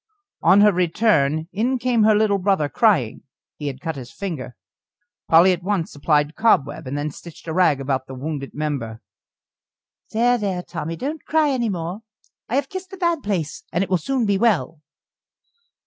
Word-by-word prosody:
On 190 +4 +6
her 210 0 +6
return, 165 -4 +2
in 245 +6 0
came 245 -2 +1
her 215 -1 +5
little 210 -2 +2
brother 190 -6 +1
crying 165 - +2 0.4
he 150 - -5
had 135 -2 -5
cut 160 0 -3
his 130 -2 -9
finger. 165 -11 -6 0.7
Polly 170 +3 +7
at 180 -1 -1
once 190 -3 -2
applied 150 +1 +1
cobweb, 145 - +1
and 140 +3 -3
then 145 +1 -2
stitched 170 +3 -13
a 160 - -3
rag 160 -5 +3
about 135 -1 -2
the 130 - -8
wounded 140 +1 -5
member. 140 -7 -3 1.1
"There, 240 +2 +2
there, 190 -4 -2
Tommy! 165 -2 -5
don't 290 - -5
cry 310 -2 +2
any 240 -4 0
more. 175 +1 -4 0.5
I 240 - -1
have 275 0 +1
kissed 375 0 -7
the 385 - -10
bad 340 -4 0
place, 180 - -3
and 175 - +1
it 195 - -7
will 185 - +3
soon 255 - -1
be 200 -2 +1
well." 165 - +1
180 Hz, 180 wpm, -22 LUFS, 150-220 Hz, 1.1 s, Polly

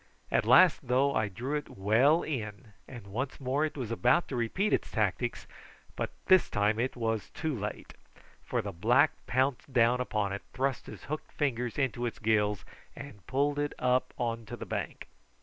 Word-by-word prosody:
At - - +2
last, 180 -4 +7
though, 135 +3 +3
I 110 - +1
drew 125 +9 -4
it 150 - -4
well 120 - +4
in, 105 -7 -5
and 120 -6 -10
once 125 +7 -4
more 135 +3 0
it 155 - -5
was 120 -4 -4
about 125 +9 +3
to 135 - -3
repeat 125 - 0
its - - 0
tactics; - - -1 0.5
but - - -2 0.2
this 185 -2 +5
time 105 +2 +1
it 130 +2 -1
was 115 -3 -2
too 160 -2 -2
late, 105 -1 -6 0.5
for - - -2
the - - -4
black 120 - +3 0.2
pounced 130 +2 0
down 120 0 +3
upon 105 -5 -1
it, 100 - -4
thrust 135 0 -1
his - - -10
hooked 155 +2 -5
finger 125 -5 -1
into 125 -3 -1
its 115 - -5
gills, 105 -2 +1 0.3
and 125 -10 -11
pulled 145 +3 +1
it 145 0 -1
up 125 0 +1
on 115 -1 -2
to - - -6
the - - -6
bank. - - -5
125 Hz, 185 wpm, -30 LUFS, 110-140 Hz, 0.5 s, last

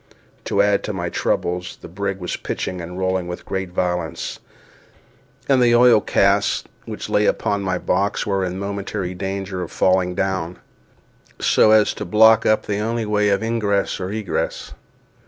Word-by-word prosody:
To 100 - +2
add 100 0 +2
to 105 - -3
my 90 -2 -3
troubles, 90 +1 -2
the - - -10
brig 100 +2 -3
was 90 -2 -4
pitching 90 -1 -4
and 90 +2 -7
rolling 95 -1 -1
with 90 0 -7
great 95 -1 -3
violence, 90 -3 -3 1.1
and 135 -2 +4
the 120 -1 +5
oil 120 -2 +6
casks - - +2 0.2
which - - -6
lay - - +2
upon 100 0 0
my 95 -1 -1
box 100 +3 0
were 100 -2 0
in 90 0 -3
momentary 100 -1 -4
danger 95 0 -4
of 90 - -6
falling 90 -1 +1
down, 95 -3 -2 0.8
so - - +4
as 110 -1 +5
to - - -6
block 110 +4 +5
up 110 - +2
the 105 -1 -2
only 115 +1 -1
way 105 0 +1
of 100 +2 +1
ingress 105 -3 0
or 95 +1 -4
egress. 105 -3 -3
100 Hz, 165 wpm, -21 LUFS, 90-105 Hz, 1.1 s, oil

